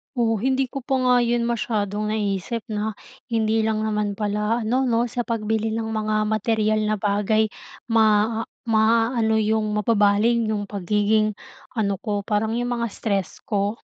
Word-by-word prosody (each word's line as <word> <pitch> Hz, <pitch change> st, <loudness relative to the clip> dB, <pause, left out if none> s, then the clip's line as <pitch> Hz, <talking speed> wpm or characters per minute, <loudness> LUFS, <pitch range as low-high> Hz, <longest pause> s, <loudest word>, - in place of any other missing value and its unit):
Oh, 225 Hz, -3 st, +1 dB
hindi 265 Hz, +1 st, 0 dB
ko 275 Hz, -, -4 dB
pa 265 Hz, +1 st, -1 dB
nga 250 Hz, 0 st, +4 dB
yun 240 Hz, 0 st, +1 dB
masyadong 215 Hz, -3 st, -1 dB
naisip 210 Hz, +2 st, -2 dB
'no? 210 Hz, 0 st, -2 dB, 0.3 s
Hindi 225 Hz, -1 st, +1 dB
lang 215 Hz, 0 st, 0 dB
naman 210 Hz, -2 st, -1 dB
pala 210 Hz, +2 st, -1 dB
ano 255 Hz, +4 st, +1 dB
'no, 235 Hz, 0 st, +2 dB
sa 240 Hz, +1 st, -3 dB
pagbili 220 Hz, -1 st, -1 dB
ng 225 Hz, -1 st, -3 dB
mga 215 Hz, -1 st, 0 dB
materyal 215 Hz, 0 st, +1 dB
na 215 Hz, -, +1 dB
bagay 210 Hz, +1 st, +1 dB, 0.4 s
maa 220 Hz, 0 st, +3 dB, 0.2 s
maaano 225 Hz, 0 st, +3 dB
yung, 215 Hz, 0 st, +1 dB
mababaling 220 Hz, +2 st, +2 dB
yung 205 Hz, -1 st, -2 dB
pagiging 210 Hz, +2 st, +1 dB, 0.4 s
ano 205 Hz, -4 st, 0 dB
ko, 210 Hz, -3 st, -1 dB
parang 210 Hz, +2 st, -1 dB
yung 245 Hz, -, -1 dB
mga 235 Hz, -, 0 dB
stress 200 Hz, -5 st, -2 dB
ko. 205 Hz, +1 st, -1 dB
220 Hz, 150 wpm, -23 LUFS, 210-230 Hz, 0.4 s, nga